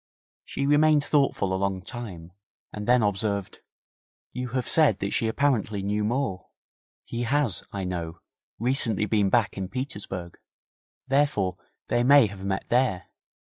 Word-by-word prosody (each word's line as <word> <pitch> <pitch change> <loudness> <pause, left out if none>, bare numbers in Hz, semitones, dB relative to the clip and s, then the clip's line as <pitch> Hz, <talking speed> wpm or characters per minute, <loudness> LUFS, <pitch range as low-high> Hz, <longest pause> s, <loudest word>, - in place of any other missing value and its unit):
She 140 - -3
remained 150 +1 +4
thoughtful 135 -10 +1
a - - +1
long 95 -2 -1
time, 95 -8 -8 0.4
and 105 -1 -6
then 125 -1 +4
observed: 100 -1 -1 0.7
'You 125 0 -4
have 125 - -2
said 150 - +5
that 100 0 -3
she 115 - +1
apparently 110 -5 0
knew 105 +1 -1
Moore? 105 -5 -2 0.6
He 120 - -4
has, 130 -4 0
I 100 -1 -4
know, 85 -2 -4 0.4
recently 115 -3 +1
been 105 -2 +2
back 105 -3 +1
in 95 - -3
Petersburg, 100 -9 -6 0.7
therefore 130 -10 +1 0.3
they 120 - +1
may 140 0 +7
have 100 -2 -7
met 95 0 -2
there. 120 -7 +1
105 Hz, 140 wpm, -26 LUFS, 95-130 Hz, 0.7 s, may